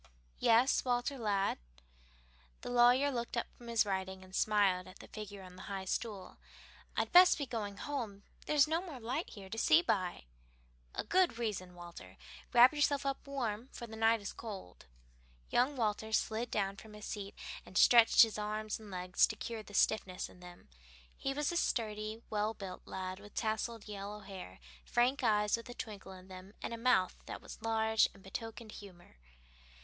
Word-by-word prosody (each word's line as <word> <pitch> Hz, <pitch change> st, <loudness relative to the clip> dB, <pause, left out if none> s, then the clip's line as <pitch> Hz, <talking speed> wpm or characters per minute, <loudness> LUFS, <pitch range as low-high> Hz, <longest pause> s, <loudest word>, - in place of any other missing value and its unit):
"Yes, 235 Hz, +4 st, +4 dB
Walter, 250 Hz, +2 st, 0 dB
lad?" 200 Hz, -3 st, 0 dB, 1.0 s
The -, -, -5 dB
lawyer 245 Hz, +4 st, +5 dB
looked 235 Hz, -1 st, -3 dB
up 235 Hz, -, +1 dB
from 240 Hz, -, -13 dB
his 230 Hz, -2 st, +3 dB
writing, 190 Hz, -1 st, -3 dB
and 185 Hz, 0 st, -10 dB
smiled 200 Hz, -4 st, +2 dB
at 185 Hz, -, -12 dB
the -, -, -12 dB
figure 205 Hz, -2 st, -8 dB
on 180 Hz, -1 st, -12 dB
the -, -, -9 dB
high 195 Hz, -1 st, -4 dB
stool. 200 Hz, -1 st, -4 dB, 0.6 s
"I'd -, -, 0 dB
best 360 Hz, 0 st, +8 dB
be 285 Hz, -, -2 dB
going 210 Hz, -5 st, -4 dB
home; 230 Hz, -9 st, -4 dB, 0.2 s
there's 300 Hz, -1 st, +5 dB
no 325 Hz, +2 st, +1 dB
more 325 Hz, -8 st, -8 dB
light 250 Hz, +8 st, -3 dB
here 195 Hz, -2 st, -10 dB
to 225 Hz, +4 st, -5 dB
see 325 Hz, +6 st, +5 dB
by." 185 Hz, -, -1 dB, 0.7 s
"A -, -, -1 dB
good 360 Hz, -, +3 dB
reason, 195 Hz, -6 st, -3 dB
Walter. 175 Hz, -1 st, -11 dB, 0.3 s
Wrap 245 Hz, +2 st, +8 dB
yourself 290 Hz, -1 st, +1 dB
up 275 Hz, 0 st, -2 dB
warm, 245 Hz, -3 st, -3 dB
for 235 Hz, -, -7 dB
the 220 Hz, -1 st, -9 dB
night 225 Hz, 0 st, +3 dB
is 200 Hz, -, -5 dB
cold." 195 Hz, -, -9 dB, 0.6 s
Young 260 Hz, +4 st, +3 dB
Walter 220 Hz, -2 st, -1 dB
slid 220 Hz, +2 st, 0 dB
down 195 Hz, -2 st, -1 dB
from 220 Hz, +1 st, -12 dB
his 210 Hz, 0 st, -9 dB
seat, 200 Hz, -1 st, -5 dB, 0.3 s
and 185 Hz, -, -6 dB
stretched 235 Hz, -1 st, +8 dB
his 220 Hz, -2 st, -1 dB
arms 215 Hz, +1 st, -3 dB
and 215 Hz, -2 st, -11 dB
legs 180 Hz, 0 st, +2 dB
to 220 Hz, -, -5 dB
cure 225 Hz, +1 st, -5 dB
the 205 Hz, -1 st, -11 dB
stiffness 190 Hz, -4 st, +1 dB
in -, -, -17 dB
them. 180 Hz, 0 st, -13 dB, 0.5 s
He 270 Hz, -, -2 dB
was 295 Hz, +3 st, 0 dB
a 345 Hz, -, -1 dB
sturdy, 215 Hz, -4 st, -1 dB
well 215 Hz, +1 st, -1 dB
built 190 Hz, -3 st, -8 dB
lad, 185 Hz, 0 st, -5 dB
with 205 Hz, 0 st, -14 dB
tousled 225 Hz, 0 st, -2 dB
yellow 205 Hz, 0 st, -6 dB
hair, 190 Hz, -, -9 dB, 0.2 s
frank 255 Hz, -, +1 dB
eyes 210 Hz, -2 st, +3 dB
with 230 Hz, +1 st, -9 dB
a 245 Hz, -, -8 dB
twinkle 200 Hz, -4 st, -7 dB
in 185 Hz, 0 st, -13 dB
them, 185 Hz, +2 st, -11 dB
and -, -, -3 dB
a -, -, -4 dB
mouth 230 Hz, -6 st, +2 dB
that -, -, -5 dB
was -, -, -11 dB
large 220 Hz, -1 st, +3 dB
and 195 Hz, -, -17 dB
betokened 225 Hz, +3 st, -7 dB
humor. 180 Hz, -, -13 dB
215 Hz, 185 wpm, -34 LUFS, 195-240 Hz, 1.0 s, best